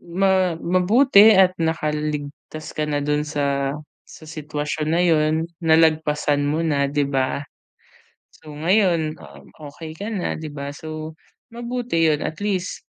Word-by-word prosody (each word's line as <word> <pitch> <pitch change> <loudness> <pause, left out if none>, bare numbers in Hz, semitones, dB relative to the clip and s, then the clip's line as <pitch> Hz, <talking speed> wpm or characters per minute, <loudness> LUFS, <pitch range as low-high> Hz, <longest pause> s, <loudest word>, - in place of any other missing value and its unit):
ma 185 0 +1
mabuti 205 +4 +5
at 190 -1 +5
nakaligtas 150 -1 -3
ka 155 - 0
na 145 -1 0
dun 150 0 +1
sa 140 -2 -1 0.4
sa - - -13
sitwasyon 150 -1 -4
na 170 +2 +2
yun 155 -2 +3 0.3
nalagpasan 155 -2 +2
mo 155 +3 0
na, 145 -3 +1
di 145 +1 0
ba? 135 +1 -1 1.0
So 150 -1 -12
ngayon, 165 -2 +1
ah, - - -13 0.3
okey 155 +2 -9
ka 205 - -5
na, 190 -4 -2
di 160 - -6
ba? 140 0 -5
So, 155 +1 -7 0.4
mabuti 240 -8 -1
yun 150 -1 +1
at 155 - -5
least, 195 -2 -2
155 Hz, 140 wpm, -22 LUFS, 150-180 Hz, 1.0 s, mabuti